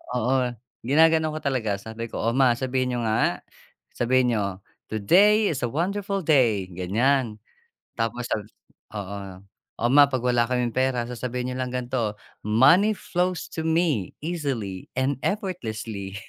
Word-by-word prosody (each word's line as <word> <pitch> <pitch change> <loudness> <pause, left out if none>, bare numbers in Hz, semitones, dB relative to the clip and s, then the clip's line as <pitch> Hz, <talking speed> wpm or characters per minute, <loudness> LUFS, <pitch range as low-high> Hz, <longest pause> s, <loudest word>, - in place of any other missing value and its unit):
Oo, 125 +1 +1 0.3
ginaganon 160 +3 +4
ko 155 - -4
talaga. 115 -8 -1
Sabi 110 +2 -6
ko, - - -5
"O, 115 +2 0
ma 130 -3 +5
sabihin 130 +1 -1
niyo 120 - -1
nga, 110 - +1 0.6
sabihin 125 0 +2
niyo, 100 -2 -2 0.3
"Today 200 - +4
is 140 -6 -3
a 120 - -2
wonderful 195 +5 -1
day!"" 120 - +3
Ganyan. 110 +6 0 0.6
Tapos 120 +2 -2
sa, - - +2 0.6
oo, 100 0 -5 0.6
"O, 120 - +2
ma 145 +1 +8
'pag 130 -3 -2
wala 120 -1 +3
kaming 125 -2 0
pera, 130 -2 +1
sasabihin 125 +1 -4
n'yo 125 - -5
lang 125 -1 -3
gan'to, 120 -4 -2 0.3
"Money 140 - +5
flows 180 -1 -2
to 160 - -4
me 160 - 0
easily 135 - -3
and 130 +1 0
effortlessly!"" 110 - -4
125 Hz, 145 wpm, -25 LUFS, 110-150 Hz, 0.6 s, ma